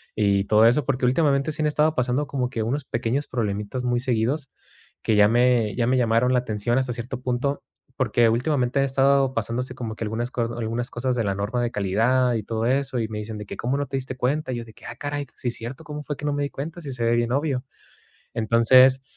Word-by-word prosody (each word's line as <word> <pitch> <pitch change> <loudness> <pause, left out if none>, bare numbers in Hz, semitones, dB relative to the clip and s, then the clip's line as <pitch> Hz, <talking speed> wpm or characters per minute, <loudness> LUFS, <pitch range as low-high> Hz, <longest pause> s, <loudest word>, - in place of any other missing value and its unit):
y 100 -2 +2
todo 110 +2 +5
eso, 125 +4 +3
porque 130 -1 0
últimamente 140 +2 +2
sí 155 +1 -3
han - - +3
estado 150 +1 +2
pasando 125 +3 0
como 130 -3 -2
que 120 -4 -3
unos 135 +6 -2
pequeños 120 +5 -2
problemitas 105 +1 -3
muy 120 -1 +1
seguidos, 125 +3 -1 0.5
que 110 - +3
ya 105 0 +7
me 120 -3 +3
ya 120 - +1
me 130 +1 +3
llamaron 115 +1 +2
la 125 - +4
atención 120 0 -1
hasta 130 -2 -2
cierto 120 +2 -6
punto, 130 +3 -1 0.3
porque 120 -3 +3
últimamente 125 +2 +1
han 135 - +3
estado 135 0 +3
pasándose 120 +3 -2
como 115 -4 -5
que 115 - -5
algunas 115 +3 -2
algunas 115 -1 0
co - - -6
algunas 115 +2 -2
cosas 125 +1 -1
de 115 - 0
la 100 -1 0
norma 105 +5 -2
de 120 - -1
calidad 115 +6 +2
y 110 - -2
todo 110 +2 -2
eso, 135 -1 0
y 110 - -1
me 110 - -5
dicen 105 0 -6
de 105 - -7
que: - - -7
"¿Cómo 125 +3 -1
no 145 - -1
te 135 - -3
diste 130 0 -5
cuenta?", 130 +3 -1
y - - -3
yo 120 - -5
de 110 - -15
que: - - -17
"Ah, 120 - -7
caray, 145 0 -4
si 125 - -3
es 120 - -4
cierto, 125 +7 -7
¿cómo 150 -2 -7
fue 145 - -4
que - - -11
no 145 - +1
me 145 0 -1
di 140 - -2
cuenta?, 160 +5 -6
si 140 -4 -6
se 120 -2 -3
ve 115 0 +3
bien, 120 0 0
obvio", 140 -2 -1 0.7
entonces 130 +4 +5
125 Hz, 245 wpm, -24 LUFS, 115-135 Hz, 0.7 s, ya